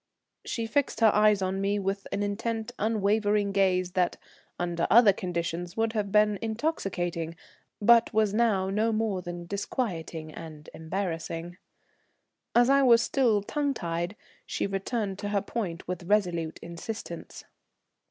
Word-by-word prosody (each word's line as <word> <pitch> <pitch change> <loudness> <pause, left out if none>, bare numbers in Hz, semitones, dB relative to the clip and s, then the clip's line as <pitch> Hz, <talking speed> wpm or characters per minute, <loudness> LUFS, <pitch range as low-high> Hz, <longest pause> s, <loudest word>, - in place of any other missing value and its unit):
She 230 - -3
fixed 240 +1 0
her 220 -2 +6
eyes 210 -2 +4
on 190 +1 -1
me 200 +1 +1
with 195 0 -2
an 205 - -1
intent 225 +2 -2
unvarying 210 -1 +1
gaze 185 -2 +2
that 180 -1 +1 0.4
under 175 -1 -1
other 225 -2 +7
conditions 175 0 -4
would 225 0 +1
have 205 -3 -1
been 210 -1 +3
intoxicating, 195 - -2 0.4
but 235 +2 +5
was 215 -2 +2
now 210 -4 +2
no 220 +3 +1
more 215 -4 0
than 175 -1 -6
disquieting 170 -5 -4
and 155 -2 -10
embarrassing. 165 0 -4 1.0
As 240 0 +6
I 275 +1 +5
was 235 -3 +6
still 230 -7 +2
tongue 285 +4 -1
tied, 170 +2 -3 0.3
she - - -1
returned 195 0 -2
to 205 - -3
her 205 -1 +1
point 195 -6 -4
with 180 -1 -4
resolute 175 -5 +1
insistence. 170 +1 -7
200 Hz, 140 wpm, -28 LUFS, 175-220 Hz, 1.0 s, other